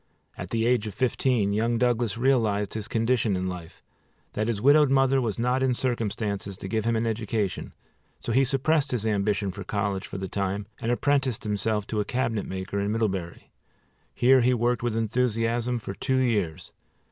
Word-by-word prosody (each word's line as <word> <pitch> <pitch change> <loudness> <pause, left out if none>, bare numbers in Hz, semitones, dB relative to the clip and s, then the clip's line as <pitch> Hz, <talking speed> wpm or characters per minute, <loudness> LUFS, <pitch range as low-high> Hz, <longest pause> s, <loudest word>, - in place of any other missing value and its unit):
At - - -7
the 115 -1 0
age 120 -3 +2
of 105 - -7
fifteen 125 -4 +1
young 115 +3 +1
Douglas 120 -3 +1
realized 110 -6 +1
his 110 -2 -3
condition 115 -2 +1
in 90 0 -2
life, 90 -3 -7 0.5
that 110 +1 -1
his 115 -3 -1
widowed 145 +4 +5
mother 135 0 +3
was 115 -4 -2
not 125 +2 +1
in 130 -2 +2
circumstances 105 -5 -2
to 95 - -7
give 110 +2 -1
him 115 0 +1
an 110 +1 0
education, 110 -3 -2 0.5
so - - -4
he 130 +4 +4
suppressed 140 +2 +1
his 120 -4 -1
ambition 100 -2 0
for 100 +2 -7
college 100 -3 -2
for - - -6
the 95 0 -4
time, 100 +2 -2
and 115 - -1
apprenticed 135 -2 +1
himself 105 0 -1
to 110 0 -2
a - - +2
cabinet 115 -3 -1
maker 95 +1 -4
in 100 +1 -1
Middlebury. 95 -6 -3 0.6
Here 130 +1 +5
he 125 +1 +3
worked 120 +1 +1
with 120 -2 -1
enthusiasm 115 +1 0
for 105 -4 -6
two 130 +6 -1
years. 105 -11 0
115 Hz, 180 wpm, -26 LUFS, 100-125 Hz, 0.6 s, widowed